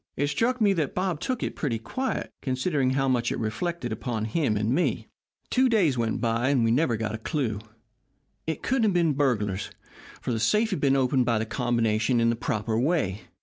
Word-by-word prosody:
It 145 - +1
struck 245 +9 0
me 205 -3 +4
that 155 -7 -2
Bob 180 -4 -1
took 255 +4 -2
it - - -3
pretty 130 -7 -1
quiet, 255 - -3
considering 130 +1 0
how 135 0 +2
much 120 -2 +1
it - - -2
reflected 120 +5 -3
upon 110 0 -3
both 110 0 -5
him 135 -10 +1
and 110 +3 0
me. 175 +6 0 0.4
"Two 260 0 +4
days 185 - +3
went 115 -2 -1
by 115 +2 +1
and 135 -4 +3
we 115 - +3
never 125 -2 +2
got 110 -1 -3
a 110 - -4
clew. 115 - -2 0.9
It 160 - -3
couldn't 265 -1 +1
have 205 - +2
been 170 -4 +2
burglars, 105 -8 0 0.5
for - - -3
the 115 - -1
safe 215 - +2
had 185 - -2
been 135 -1 +3
opened 130 -1 +2
by 115 -2 +2
the 110 - -1
combination 115 -1 +1
in 115 0 +3
the - - -1
proper 110 -2 -1
way. 125 - 0
130 Hz, 210 wpm, -26 LUFS, 115-165 Hz, 0.9 s, me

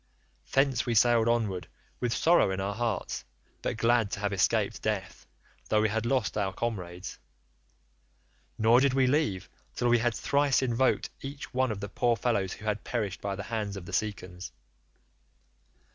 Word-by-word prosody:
"Thence 135 -3 +2
we 120 - +1
sailed 115 0 +4
onward 105 -8 0 0.3
with 125 -2 -1
sorrow 165 - +4
in 95 0 -2
our 100 +1 -2
hearts, 110 -3 -2 0.4
but - - -2
glad 115 -2 +3
to - - -3
have 100 -1 -1
escaped 95 - +1
death - - -3 0.4
though 110 - +3
we 110 - +3
had 110 +2 -1
lost 125 -5 0
our 100 -2 0
comrades, 95 -4 -5 1.4
nor 115 +2 +5
did 135 -1 +2
we 135 -1 +4
leave 125 - +1 0.3
till 120 - +1
we 120 0 +5
had 120 0 +1
thrice 140 -1 +2
invoked 130 +1 +1
each 140 +1 -7
one 130 -1 +1
of 105 -2 -5
the 100 - -3
poor 120 +3 +1
fellows 100 -4 0
who 105 - -11
had 105 -1 -1
perished 105 -6 -3
by 100 -1 -2
the 100 - -5
hands 105 -2 -3
of 90 - -8
the - - -9
Cicons. 90 -4 -3
110 Hz, 170 wpm, -29 LUFS, 100-120 Hz, 1.4 s, nor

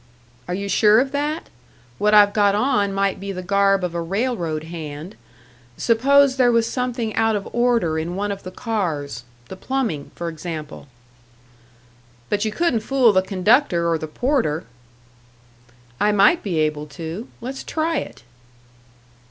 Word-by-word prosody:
"Are 180 - -2
you 200 +1 -4
sure 210 +2 +5
of 265 +1 0
that? 295 +3 -2 0.5
What 210 +1 +3
I've 205 -1 +6
got 205 -1 +3
on 205 -4 +1
might 195 0 0
be 200 +1 -5
the 185 -1 -6
garb 195 +1 +2
of 180 -2 -2
a 170 - -2
railroad 175 -4 -2
hand. 160 +2 -8 0.6
Suppose 270 +4 +3
there 250 -2 +4
was 230 -1 +3
something 240 -3 -3
out 225 -1 +2
of 200 - -4
order 235 -10 +1
in 170 +3 -4
one 205 +1 -2
of 200 - -5
the 185 - -7
cars 165 - -3 0.2
the - - -8
plumbing, 225 - -3
for 170 - -5
example?" 160 -3 -7 1.4
"But 205 0 0
you 215 - -1
couldn't 330 -2 +1
fool 245 -1 +3
the 185 - +4
conductor 190 -1 +2
or 165 -1 +1
the 155 - -5
porter." 185 - 0 1.4
"I 210 - +3
might 205 - +4
be 185 -6 -3
able 150 -1 -1
to. 165 - -7
Let's 260 +3 -6
try 320 0 -1
it." - - -6
200 Hz, 155 wpm, -21 LUFS, 170-240 Hz, 1.4 s, I've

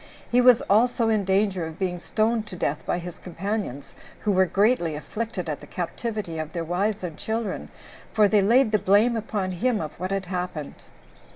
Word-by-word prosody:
He 245 +1 +5
was 250 -2 +6
also 230 +2 +3
in 215 -3 +1
danger 190 -3 +1
of 160 0 -9
being 180 -2 -2
stoned 220 +3 0
to 190 - -7
death 150 -4 -2
by - - +1
his 175 -1 -7
companions, 180 - -4 0.3
who 210 - +1
were 190 -1 +4
greatly 195 -4 +2
afflicted 215 +4 -4
at 150 -2 -3
the - - -11
captivity 190 -1 -4
of 155 -1 -5
their 170 -2 -2
wives 195 +5 -1
and 170 -4 -4
children, 220 0 -3 0.4
for 215 -2 +5
they 205 0 +4
laid 230 +4 +4
the 215 - +3
blame 210 +6 +4
upon 210 -4 -2
him 225 +5 0
of 155 -2 -4
what 185 +1 -2
had 195 -1 -2
happened. 180 -4 -5
195 Hz, 190 wpm, -25 LUFS, 175-220 Hz, 0.4 s, was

